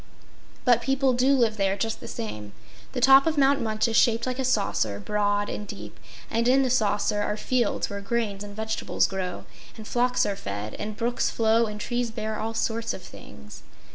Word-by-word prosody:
But 245 -3 +5
people 270 -1 +2
DO 260 +3 +3
live 230 -4 +2
there, 195 -1 +1
just 225 +2 -2
the - - -9
same. 105 -2 -6 0.4
The 250 - -2
top 270 +3 +7
of 315 -1 0
Mount 280 0 +4
Munch 220 0 0
is 225 - -2
shaped 230 -1 +3
like 255 0 -3
a - - 0
saucer, 195 - 0
broad 205 - 0
and 210 - -5
deep, 200 - -9 0.3
and 230 +1 0
in 265 +2 +5
the 255 - 0
saucer 210 -3 +1
are 210 +1 -1
fields 240 0 0
where 200 0 -6
grains 205 -1 -2
and 205 0 -9
vegetables 220 0 0
grow, 185 -2 -4 0.3
and 215 -1 -9
flocks 250 +1 +1
are 205 - -1
fed, 100 - -5
and 210 0 -5
brooks 240 +1 0
flow 225 0 +2
and 210 0 -6
trees 240 +2 -2
bear 220 -1 -4
all 225 +1 -3
sorts 225 0 -1
of 185 - -10
things. 70 - -12
220 Hz, 200 wpm, -26 LUFS, 205-245 Hz, 0.4 s, top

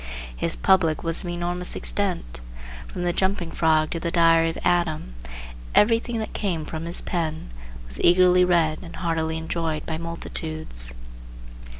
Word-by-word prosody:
His - - +1
"public" 160 - +3
was 165 -1 0
of 175 - -5
enormous 175 +1 -3
extent. 175 - -1 0.5
From 175 - -5
"The 175 0 +1
Jumping 190 -3 0
Frog" 155 -1 +2
to 165 - -2
the 170 - -2
"Diary 165 -1 +4
of 165 - -5
Adam" 160 - 0 0.6
everything 230 +2 +3
that 220 - -4
came 175 -7 -2
from 160 +1 -5
his 170 +1 0
pen 160 - -3 0.3
was 60 +1 -6
eagerly 180 +1 +5
read 165 -3 +2
and 170 -2 -10
heartily 160 -2 -1
enjoyed 160 -1 -3
by 160 -1 -3
multitudes. 155 - -4
165 Hz, 145 wpm, -24 LUFS, 160-175 Hz, 0.6 s, eagerly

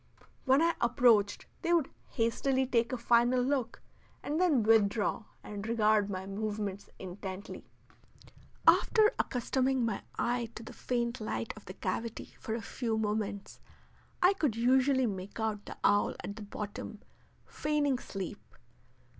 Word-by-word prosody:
When 270 +4 +5
I 335 0 +3
approached 230 -4 +3 0.2
they 340 0 +1
would 325 -5 +2 0.2
hastily 260 +3 +1
take 235 -2 +1
a 255 - -1
final 240 +1 +3
look 250 -2 -1 0.4
and 305 +4 -1
then 305 -11 +3
withdraw 215 0 +2 0.2
and 205 0 -6
regard 215 -2 +3
my 190 -1 -4
movements 205 0 -4
intently. 190 +1 -7 1.0
After 435 -1 +6
accustoming 260 +1 +1
my 225 -3 -2 0.2
eye 240 -1 0
to 225 - -7
the - - -10
faint 240 -1 -2
light 215 +1 -3
of 215 - -13
the 185 - -9
cavity 225 +4 -4
for 220 - -3
a 230 - -5
few 230 -3 -2
moments, 210 -2 -3 0.6
I 365 +2 +6
could 300 - 0
usually 260 +2 +3
make 195 -1 -5
out 215 -2 -2
the - - -8
owl 205 0 +3
at 200 - -5
the 220 - -9
bottom 205 +1 -6 0.4
feigning 290 -3 0
sleep. 195 -6 -6
230 Hz, 140 wpm, -31 LUFS, 205-255 Hz, 1.0 s, After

